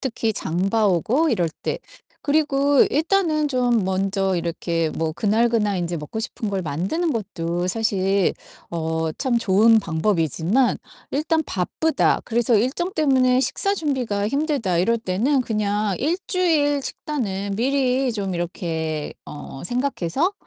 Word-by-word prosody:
특히 230 -4 -1
장 180 +1 -1
봐 220 -1 +3
오고 225 - +2
이럴 180 -8 +1
때. - - -2 0.4
그리고 285 -2 +3
일단은 320 -1 +1
좀 245 -5 +1
먼저 190 0 0
이렇게 170 -1 -1
뭐 160 0 -2
그날 220 +7 +2
그날 210 -4 +1
인제 175 0 -2
먹고 150 +8 -6
싶은 220 -2 -4
걸 195 -1 -1
만드는 185 - -1
것도 175 -5 -3
사실 195 -2 +1 0.4
어 160 -1 -1
참 255 -4 +1
좋은 225 +1 +5
방법이지만 175 - +1 0.4
일단 315 +3 +1
'바쁘다. 310 - 0
그래서 235 0 +2
일정 265 - 0
때문에 260 -5 +3
식사 395 +8 +1
준비가 250 - -1
힘들다.' 275 - 0
이럴 230 +7 +2
때는 230 +8 +1
그냥 210 -3 -1
일주일 320 -3 +1
식단은 205 -11 -3
미리 260 +1 +1
좀 195 -4 -3
이렇게 160 -3 -3
어 145 -2 -9
생각해서 250 - -1
220 Hz, 275 characters per minute, -22 LUFS, 180-275 Hz, 0.4 s, 좋은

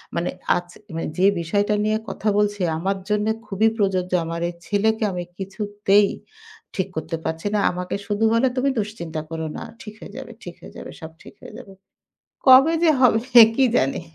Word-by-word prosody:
মানে 170 +1 -1 0.3
আজ 175 0 -3 0.3
মানে 165 - -3
যে 185 - +3
বিষয়টা 205 +5 0
নিয়ে 215 0 +1
কথা 215 - -2
বলছি 205 -1 0 0.2
আমার 195 +4 -1
জন্য 210 0 +1 0.2
খুবই 210 +2 +2
প্রযোজ্য। 190 -3 0
আমার 165 +1 -4
এই - - -8
ছেলেকে 220 +2 0
আমি 180 -1 -4
কিছুতেই 205 +1 +1 0.7
ঠিক 190 -1 -1
করতে 160 +1 -4
পারছি 160 +4 -3
না। - - +2
আমাকে 180 0 -4
শুধু 205 0 -1
বলে, 230 +3 +3
"তুমি 265 +2 +2
দুশ্চিন্তা 170 -7 -5
করো 160 -1 -4
না। - - -6 0.2
ঠিক 210 - -9
হয়ে 205 - -11
যাবে। 265 -3 -8
ঠিক 175 -1 -9
হয়ে - - -12
যাবে। - - -9
সব 160 0 -8
ঠিক - - -14
হয়ে 215 - -11
যাবে।" 205 -6 -13 0.8
কবে 270 +5 +7
যে 335 - +5
হবে, 240 -4 +4 0.4
কী 270 - +4
জানি? 135 - +1
205 Hz, 180 wpm, -22 LUFS, 175-215 Hz, 0.8 s, কবে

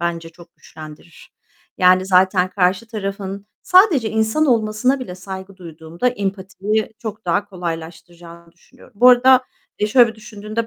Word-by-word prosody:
bence 170 -1 -3
çok 170 +1 -18
güçlendirir. 155 +1 -14 0.5
Yani, 185 +1 +4
zaten 185 0 +2
karşı 185 +3 0
tarafın 200 -2 -6 0.2
sadece 360 - +4
insan 220 +8 0
olmasına 230 +2 +1
bile 180 -8 -7
saygı 190 +1 -9
duyduğumda 165 +4 -4
empatiyi 205 0 -3
çok 220 -2 -8
daha 200 +4 0
kolaylaştıracağını 170 -2 -9
düşünüyorum. 175 - -22
Bu 250 - +8
arada, 255 +1 +6 0.4
eee, 210 - 0
şöyle 235 +2 +5
bir - - -13
düşündüğümde 215 0 -6
195 Hz, 135 wpm, -19 LUFS, 175-220 Hz, 0.5 s, Bu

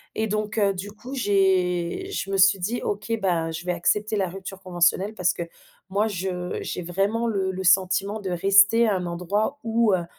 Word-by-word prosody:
et 220 - 0
donc 215 +1 -3
heu, 200 -2 +3
du 190 +2 -6
coup, 245 +6 -9
j'ai 190 - +1
je 195 - -3
me 195 - 0
suis 195 +1 +5
dit: 220 +7 -2
«OK 205 +3 -3
bah, 170 -4 0
je 165 +2 -6
vais 180 - 0
accepter 210 +5 0
la 195 -3 0
rupture 195 +1 -8
conventionnelle» 185 +2 +1
parce 180 -3 +1
que 170 - -4 0.5
moi, 205 +3 +1
je 180 -3 -4
j'ai - - -4
vraiment 195 +7 -1
le 195 -4 -1
le 190 0 -5
sentiment 190 +3 +2
de 195 - -4
rester 195 +6 +4
à 210 - +2
un 180 -1 -3
endroit 180 +9 -2
où, 225 -2 +2
heu, 175 -2 0
195 Hz, 200 wpm, -24 LUFS, 180-210 Hz, 0.5 s, suis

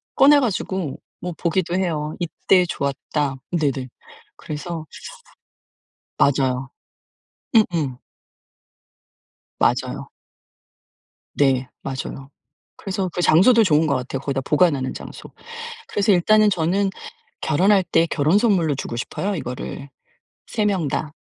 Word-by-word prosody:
꺼내 285 +1 +7
가지고 190 - -2 0.2
뭐 180 0 -5
보기도 175 0 0
해요. 160 -5 -1
"이때 180 +1 +2
좋았다." 140 -1 -2 0.2
네네. 140 -6 -1 0.5
그래서 155 +2 -6 1.3
맞아요. 130 -2 +1 0.9
음음. 165 - +2 1.6
맞아요. - - 0 1.2
네 130 -2 +2
맞아요. 135 0 -6 0.5
그래서 190 -1 -3
그 180 - -1
장소도 225 +9 +6
좋은 160 -4 +3
거 140 - +1
같아요. 130 +1 -3
거기다 135 0 -2
보관하는 145 -2 +2
장소. - - -9 0.6
그래서 205 +1 +1
일단은 210 +4 +5
저는 190 +2 +1 0.5
결혼할 190 +5 +3
때 165 -1 +2
결혼 155 +6 +2
선물로 190 - +2
주고 125 -3 -5
싶어요 195 +11 -3
이거를. 140 -1 -6 0.6
3 215 -2 -1
명 190 -7 +1
다. 150 +2 -3
165 Hz, 230 characters per minute, -22 LUFS, 140-190 Hz, 1.6 s, 꺼내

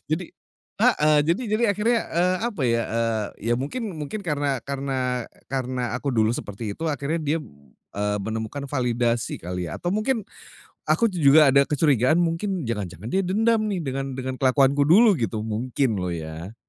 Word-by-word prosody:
jadi 180 - -5 0.6
heeh, 150 0 +4
jadi 175 +9 +1
jadi 220 +2 +1
akhirnya, 230 +2 +2
eee, 180 +2 +2
apa 185 - -6
ya, 115 0 +2
eee, 115 -2 0 0.3
ya - - +5
mungkin 205 - -4
mungkin 150 +9 -4
karena 145 -5 -1
karena, 130 -3 -2
eee, - - -28
karena 125 -3 -2
aku 140 - -6
dulu 110 -1 +2
seperti 105 -2 -5
itu, 165 - -3
akhirnya 145 +3 -1
dia 155 +1 0
b - - -13 0.5
eee, 105 0 0
menemukan 110 +6 -4
validasi 120 - -1
kali 90 -1 -4
ya 75 - -5
atau 175 - -2
mungkin, 215 +2 0 0.6
aku 230 -1 +3
tuh 180 -3 -5
juga 145 +1 +7
ada 140 +1 +5
kecurigaan 145 0 +2
mungkin 170 -1 -1
jangan-jangan 100 -1 -4
dia 195 - +1
dendam 220 +3 +2
nih 185 -4 -2
dengan 135 -1 -3
dengan 130 0 -3
kelakuanku 135 +1 +3
dulu 200 +3 +6
gitu 110 -2 -2
mungkin 115 +1 -1
loh 90 -1 -2
ya. 80 +5 -7
135 Hz, 175 wpm, -24 LUFS, 115-170 Hz, 0.6 s, juga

